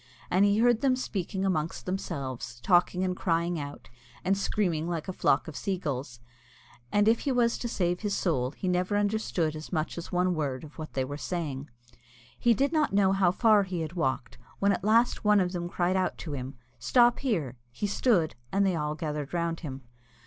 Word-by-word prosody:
And 190 +3 +5
he 205 0 +3
heard 235 0 +4
them 265 -2 +3
speaking 195 -5 -3
amongst 160 -4 -1
themselves, 135 -10 -4
talking 180 0 +3
and 185 -1 0
crying 170 -1 0
out, 145 0 -7 0.4
and 195 +2 +3
screaming 175 -5 0
like 165 -1 -3
a 185 - -3
flock 140 - +2
of 155 - -7
sea 195 -2 -2
gulls; 130 -7 -4 0.7
and 205 0 +3
if 230 +1 +4
he 280 - -1
was 240 -2 +2
to 240 - -3
save 180 -5 0
his 205 -2 -1
soul 130 -9 0
he 165 +7 -6
never 180 +3 +1
understood 205 -6 0
as 155 0 -8
much 160 0 -2
as 170 - -8
one 180 0 +2
word 140 -5 -2
of 155 +1 -12
what 155 - -7
they 130 -1 0
were 145 +2 -5
saying. 150 -6 -4 0.7
He 235 -1 +4
did 280 +5 +1
not 305 -8 +2
know 195 -1 +4
how 195 -2 +3
far 215 +3 +4
he 185 -3 -3
had 160 +1 -4
walked, 130 -8 -2 0.2
when 200 0 +3
at 180 - -1
last 230 +4 +3
one 210 -1 +5
of 180 -2 +1
them 175 -1 -3
cried 180 +1 0
out 185 -1 0
to 160 - -6
him, 135 0 -5 0.2
"Stop 240 - +4
here!" 160 - -2
He 165 - -3
stood, 200 -5 +2 0.2
and 200 +1 +2
they 190 -2 +2
all 150 -1 -2
gathered 150 -1 -4
round 170 -1 -1
him. 135 -4 -7
180 Hz, 205 wpm, -28 LUFS, 155-200 Hz, 0.7 s, And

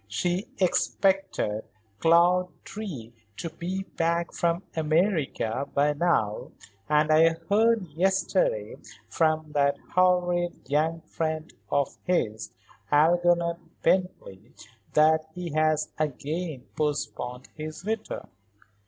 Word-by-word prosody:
She 175 - -1
expected 190 - +1 0.4
Claude 175 +2 +4 0.2
Drew 155 - -7 0.3
to 165 - -5
be 185 +4 -4
back 170 -1 -1
from 170 +2 0
America 155 - 0
by 145 +1 +3
now 145 -10 0 0.4
and 150 +1 +3
I 165 +1 +5
heard 220 0 +3
yesterday 195 - 0 0.3
from 155 -2 0
that 140 -1 +2 0.2
horrid 180 -1 +2
young 160 +3 +1
friend 160 0 -4 0.2
of 140 -2 0
his, 110 -12 0 0.4
Algernon 170 +2 +3 0.3
Bently, 125 - -1 0.4
that 155 +1 +4
he 180 -2 -5
has 155 0 +1
again 155 0 -3
postponed 130 -4 -3
his 155 +2 -7
return. 220 0 -3
165 Hz, 100 wpm, -27 LUFS, 150-180 Hz, 0.4 s, I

